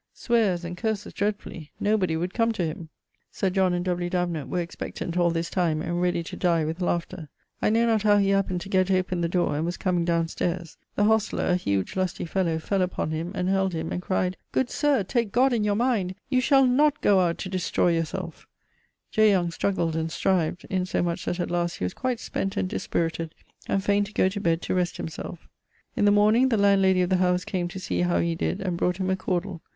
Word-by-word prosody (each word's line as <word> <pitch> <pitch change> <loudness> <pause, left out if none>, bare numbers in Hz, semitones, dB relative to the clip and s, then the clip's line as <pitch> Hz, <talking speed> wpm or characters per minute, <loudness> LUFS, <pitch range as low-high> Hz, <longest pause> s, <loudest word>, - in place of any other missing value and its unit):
sweares 205 -8 +1
and 175 +1 -6
curses 220 -2 -3
dreadfully; 200 -6 -3
nobody 195 -6 +1
would 180 +3 -3
come 230 -1 +2
to 190 -6 -1
him. 160 +1 -6 0.4
Sir 190 - -1
John 190 -1 +2
and 175 0 -1
W. 175 -1 -1
Davenant 175 -5 -2
were 180 - -1
expectant 170 0 -5
all 175 -1 +3
this 165 0 -2
time, 170 -4 +1
and 175 +2 -2
ready 175 -1 +1
to - - -7
dye 170 -3 +1
with 160 +4 -4
laughter. 170 -2 -2 0.3
I - - +3
know 230 +2 +3
not 225 -2 +2
how 205 0 +4
he 200 -1 +2
happened 195 -2 +1
to 190 - -8
gett 185 -1 +2
open 185 -2 +1
the 170 - 0
dore, 175 -3 +1
and 150 - -1
was 175 +2 -2
comeing 180 -2 0
downe 170 -1 +1
stayres. 170 0 -3 0.2
The 205 - +2
hostler, 220 0 +2
a 180 - +2
huge 100 - -1
lusty 185 -2 -1
fellow, 170 -2 0
fell 190 +4 -1
upon 180 -3 -1
him, 165 +3 -3
and 180 -2 -1
held 190 -1 +1
him, 160 0 -3
and 180 - -2
cryed, 185 0 -1
'Good 260 - 0
sir, 285 -7 +2
take 230 +1 -1
God 255 +3 +3
in 225 -3 +1
your 205 -1 +1
mind, 215 -6 0
you 255 -2 +2
shall 270 +1 +5
not 290 +4 +3
goe 200 -2 +4
out 175 -2 +1
to 190 - -5
destroy 180 -1 +1
your 165 0 +1
selfe.' 170 0 -7 0.6
J. 215 -1 +5
Young 180 -4 +2
struggled 165 -2 -1
and 160 0 -2
strived, 175 -1 0
insomuch 180 -2 -1
that 175 - -2
at 175 - -2
last 175 -1 0
he - - -5
was 90 - -3
quite 255 -2 -2
spent 195 -3 -3
and - - 0
dispirited, 165 -2 -2 0.3
and 195 - 0
faine 205 +1 +2
to 210 - -12
goe 185 - +3
to 200 +1 -5
bed 165 -1 +1
to - - -2
rest 180 -1 0
himselfe. 165 +1 -7 0.5
In - - +2
the 205 - +6
morning 215 +5 +4
the 225 - +2
landlady 195 -2 +4
of 180 - -2
the 185 - +4
house 180 0 +1
came 180 -2 -2
to 185 +2 -7
see 185 - -2
how 175 0 +2
he 170 0 +1
did, 185 +4 -2
and 180 -3 -2
brought 180 +1 0
him 190 -1 -1
a - - +2
cawdle. 180 -2 -3
185 Hz, 230 wpm, -25 LUFS, 170-200 Hz, 0.6 s, the